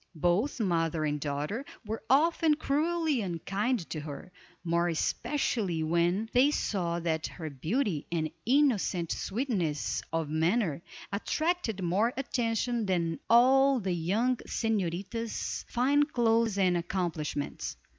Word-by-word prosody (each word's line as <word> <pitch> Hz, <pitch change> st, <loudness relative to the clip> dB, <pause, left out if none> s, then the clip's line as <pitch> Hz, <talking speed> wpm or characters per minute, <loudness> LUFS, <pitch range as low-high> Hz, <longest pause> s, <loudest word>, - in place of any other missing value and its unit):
Both 175 Hz, -, +1 dB
mother 165 Hz, -6 st, +1 dB
and 150 Hz, -1 st, -1 dB
daughter 150 Hz, -, -2 dB, 0.2 s
were 220 Hz, +1 st, -4 dB
often 315 Hz, +3 st, +4 dB
cruelly 310 Hz, -1 st, 0 dB
unkind 195 Hz, +4 st, -2 dB
to 155 Hz, -, -3 dB
her, 150 Hz, +4 st, -8 dB, 0.3 s
more 170 Hz, 0 st, +1 dB
especially 185 Hz, -, -1 dB
when 170 Hz, +6 st, +1 dB
they 255 Hz, +4 st, +5 dB
saw 175 Hz, -11 st, -1 dB
that 160 Hz, -1 st, -1 dB
her 160 Hz, -4 st, -7 dB
beauty, 165 Hz, -, -1 dB
and 160 Hz, -2 st, -1 dB
innocent 230 Hz, -, +2 dB
sweetness 190 Hz, -, -1 dB
of 165 Hz, -1 st, -1 dB
manner, 165 Hz, +2 st, +1 dB, 0.3 s
attracted 245 Hz, -, -1 dB
more 200 Hz, +8 st, +1 dB
attention 235 Hz, -3 st, -1 dB
than 170 Hz, -3 st, 0 dB
all 265 Hz, +3 st, +6 dB
the 190 Hz, -4 st, -1 dB
young 210 Hz, +10 st, +1 dB
señorita's 215 Hz, +1 st, -2 dB
fine 270 Hz, +4 st, +3 dB
clothes 230 Hz, -6 st, +2 dB
and 185 Hz, -3 st, +3 dB
accomplishments. 170 Hz, -5 st, -3 dB
195 Hz, 115 wpm, -30 LUFS, 170-245 Hz, 0.3 s, all